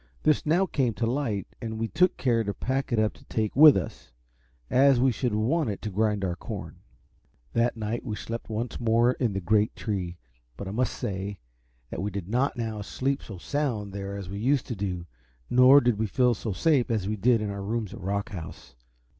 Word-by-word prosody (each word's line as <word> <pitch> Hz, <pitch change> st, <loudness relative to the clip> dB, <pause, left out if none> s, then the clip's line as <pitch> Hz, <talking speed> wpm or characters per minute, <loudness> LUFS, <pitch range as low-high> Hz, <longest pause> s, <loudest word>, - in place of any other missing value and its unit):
This 155 Hz, 0 st, +2 dB
now 175 Hz, +5 st, +4 dB
came 130 Hz, -, 0 dB
to 105 Hz, -, -1 dB
light, 115 Hz, -5 st, -1 dB, 0.2 s
and 110 Hz, -2 st, -4 dB
we 115 Hz, 0 st, -1 dB
took 180 Hz, +8 st, +2 dB
care 115 Hz, -3 st, +2 dB
to 100 Hz, -1 st, -3 dB
pack 135 Hz, +1 st, -2 dB
it 120 Hz, -, +1 dB
up 110 Hz, -1 st, +2 dB
to -, -, -19 dB
take 110 Hz, -2 st, -2 dB
with 150 Hz, 0 st, +9 dB
us, -, -, -6 dB, 0.6 s
as 135 Hz, -, +5 dB
we 130 Hz, +1 st, +4 dB
should 120 Hz, -1 st, -1 dB
want 125 Hz, +6 st, +1 dB
it 100 Hz, -, -3 dB
to 105 Hz, -, -3 dB
grind 105 Hz, 0 st, +1 dB
our 90 Hz, -2 st, -1 dB
corn. -, -, -7 dB, 0.8 s
That 115 Hz, 0 st, +1 dB
night 110 Hz, +2 st, -3 dB
we 110 Hz, -5 st, -4 dB
slept 115 Hz, +2 st, -6 dB
once 115 Hz, +2 st, -3 dB
more 115 Hz, +1 st, +3 dB
in 120 Hz, -4 st, -1 dB
the 95 Hz, -, -1 dB
great 105 Hz, +4 st, +2 dB
tree; 90 Hz, -5 st, -3 dB, 0.4 s
but 100 Hz, -, -6 dB
I -, -, -4 dB
must 125 Hz, +4 st, 0 dB
say 100 Hz, +1 st, -4 dB, 0.5 s
that -, -, -4 dB
we 100 Hz, -, -1 dB
did 95 Hz, -3 st, -5 dB
not 125 Hz, +6 st, 0 dB
now 110 Hz, -3 st, -3 dB
sleep 135 Hz, +6 st, -2 dB
so 100 Hz, -, -9 dB
sound 110 Hz, -4 st, -2 dB
there 100 Hz, 0 st, -5 dB
as 100 Hz, -2 st, -6 dB
we 100 Hz, +2 st, -5 dB
used 135 Hz, +4 st, +2 dB
to 120 Hz, -, -2 dB
do, 95 Hz, -3 st, -3 dB, 0.5 s
nor 130 Hz, +3 st, +8 dB
did 120 Hz, -5 st, +1 dB
we 110 Hz, -, +1 dB
feel 125 Hz, +3 st, +3 dB
so 110 Hz, 0 st, -4 dB
safe 135 Hz, -, +2 dB
as 110 Hz, -5 st, 0 dB
we 105 Hz, -, -1 dB
did 115 Hz, +3 st, +3 dB
in 105 Hz, -1 st, -2 dB
our 100 Hz, 0 st, -5 dB
rooms 110 Hz, 0 st, -3 dB
at -, -, -9 dB
Rock 100 Hz, +2 st, -2 dB
House. 90 Hz, -6 st, -8 dB
110 Hz, 215 wpm, -27 LUFS, 100-125 Hz, 0.8 s, with